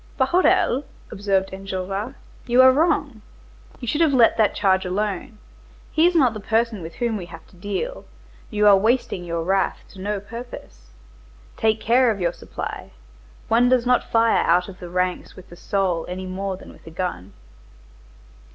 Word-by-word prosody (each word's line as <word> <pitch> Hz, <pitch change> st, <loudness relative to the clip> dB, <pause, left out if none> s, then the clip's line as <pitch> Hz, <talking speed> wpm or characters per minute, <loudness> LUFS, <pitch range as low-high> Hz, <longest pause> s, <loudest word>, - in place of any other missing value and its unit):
"Bahorel," 270 Hz, -2 st, +3 dB, 0.3 s
observed 195 Hz, -1 st, 0 dB
Enjolras, 195 Hz, +5 st, -4 dB, 0.3 s
"you 245 Hz, +1 st, +3 dB
are 260 Hz, -, +8 dB
wrong. 290 Hz, -5 st, 0 dB, 0.6 s
You 245 Hz, -, -7 dB
should 295 Hz, +7 st, 0 dB
have 305 Hz, -4 st, +4 dB
let 235 Hz, -3 st, +5 dB
that 215 Hz, -2 st, +2 dB
charge 190 Hz, -2 st, +2 dB
alone, 205 Hz, +4 st, -3 dB, 0.5 s
he 320 Hz, +2 st, +4 dB
is 355 Hz, -, 0 dB
not 260 Hz, -8 st, +4 dB
the 215 Hz, -, -6 dB
person 225 Hz, 0 st, 0 dB
with 165 Hz, 0 st, -8 dB
whom 235 Hz, -2 st, -1 dB
we 180 Hz, -3 st, -7 dB
have 165 Hz, -2 st, -12 dB
to -, -, -20 dB
deal, 205 Hz, -, -4 dB, 0.4 s
you 210 Hz, -2 st, +1 dB
are 205 Hz, -1 st, +8 dB
wasting 220 Hz, -2 st, 0 dB
your 170 Hz, -1 st, -3 dB
wrath 190 Hz, +2 st, 0 dB
to 190 Hz, -, -12 dB
no 205 Hz, +1 st, -2 dB
purpose. 200 Hz, -, -10 dB, 0.7 s
Take 220 Hz, 0 st, +1 dB
care 245 Hz, +3 st, +3 dB
of 210 Hz, -3 st, -1 dB
your 175 Hz, -1 st, 0 dB
supply. -, -, -7 dB, 0.5 s
One 240 Hz, +2 st, +4 dB
does 250 Hz, -1 st, +3 dB
not 250 Hz, 0 st, +2 dB
fire 230 Hz, 0 st, +3 dB
out 180 Hz, +2 st, +2 dB
of 190 Hz, -2 st, -11 dB
the 175 Hz, -, -8 dB
ranks 180 Hz, +1 st, -2 dB
with 185 Hz, -, -14 dB
the -, -, -10 dB
soul 180 Hz, -2 st, -1 dB
any 185 Hz, +1 st, -5 dB
more 190 Hz, +1 st, -4 dB
than -, -, -13 dB
with -, -, -20 dB
a -, -, -6 dB
gun." 160 Hz, -, -5 dB
205 Hz, 175 wpm, -22 LUFS, 185-240 Hz, 0.7 s, are